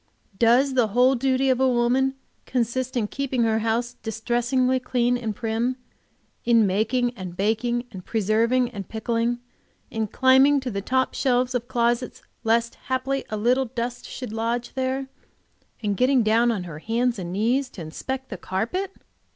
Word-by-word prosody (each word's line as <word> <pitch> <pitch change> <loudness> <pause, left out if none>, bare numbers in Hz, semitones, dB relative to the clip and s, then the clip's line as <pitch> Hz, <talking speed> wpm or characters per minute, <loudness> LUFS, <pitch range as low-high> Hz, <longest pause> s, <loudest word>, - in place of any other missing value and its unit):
Does 245 +4 +4
the 250 -4 +3
whole 255 +2 +6
duty 265 +1 +2
of 255 - +1
woman 260 +1 +2 0.3
consist 255 +1 -1
in 225 - +1
keeping 260 0 -1
her 220 -1 +2
house 230 +2 -1
distressingly 240 +3 0
clean 245 -1 +1
and 225 -4 -3
prim; 230 +3 -1 0.7
in 230 -2 +4
making 225 +5 +1
and 180 -4 -7
baking 235 +4 0
and 185 -3 -9
preserving 230 +4 +1
and 200 -5 -7
pickling; 230 +1 -1 0.5
in 220 -2 -1
climbing 265 +5 +5
to 255 -2 -4
the 200 -1 -3
top 260 +5 0
shelves 250 -1 +1
of 240 -1 -2
closets 240 0 0 0.2
lest 230 +1 +2 0.2
haply 265 +1 -1
a 215 - -3
little 250 +5 +2
dust 240 +1 -4
should 250 -5 -6
lodge 230 +2 -2
there, 265 +1 -2 0.8
and 205 -2 0
getting 255 -1 +4
down 230 +2 +3
on 205 -5 -2
her 165 -4 -8
hands 230 +4 0
and 175 -2 -5
knees 240 +7 +1
to 190 - -10
inspect 260 +12 -5
the 190 - -5
carpet? 235 - -2
240 Hz, 160 wpm, -24 LUFS, 225-255 Hz, 0.8 s, whole